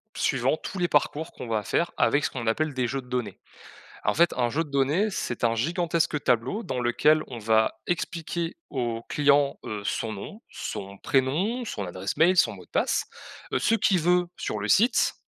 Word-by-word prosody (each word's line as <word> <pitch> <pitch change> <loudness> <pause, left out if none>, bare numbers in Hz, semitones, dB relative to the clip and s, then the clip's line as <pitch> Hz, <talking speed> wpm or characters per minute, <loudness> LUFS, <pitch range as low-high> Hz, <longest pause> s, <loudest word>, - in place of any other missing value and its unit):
suivant - - +1
tous 195 - -7
les 175 - +2
parcours 150 +1 0
qu'on 125 - -8
va 110 -2 0
faire 170 - 0
avec 145 +1 +3
ce - - +1
qu'on 120 -3 -5
appelle 155 +7 0
des 125 -2 0
jeux 135 +2 -3
de 125 - -18
données. 125 -3 -3 0.7
En - - +2
fait, 170 +2 +4
un 120 -1 +2
jeu 155 +7 -1
de 150 - -14
données, 145 +10 +2
c'est 120 - -3
un 115 0 +3
gigantesque 165 - 0
tableau 125 - +1
dans 130 -8 -3
lequel 150 +6 +3
on 125 - -7
va 110 0 +2
expliquer 170 -1 -3
au 120 -4 -2
client, 145 -1 +3
heu, 105 -1 -4
son 110 +1 -2
nom, 200 - -8
son 100 0 -6
prénom, 160 - 0
son 105 - -4
adresse 95 +2 -4
mail, 180 +3 +4
son 115 - +5
mot 90 -2 -12
de - - -29
passe, - - +1 0.5
heu, - - +2
ce 225 - +2
qu'il 195 -5 +3
veut 180 +2 +3
sur 105 - -3
le 105 - -3
site, 235 - +4
140 Hz, 200 wpm, -26 LUFS, 115-170 Hz, 0.7 s, son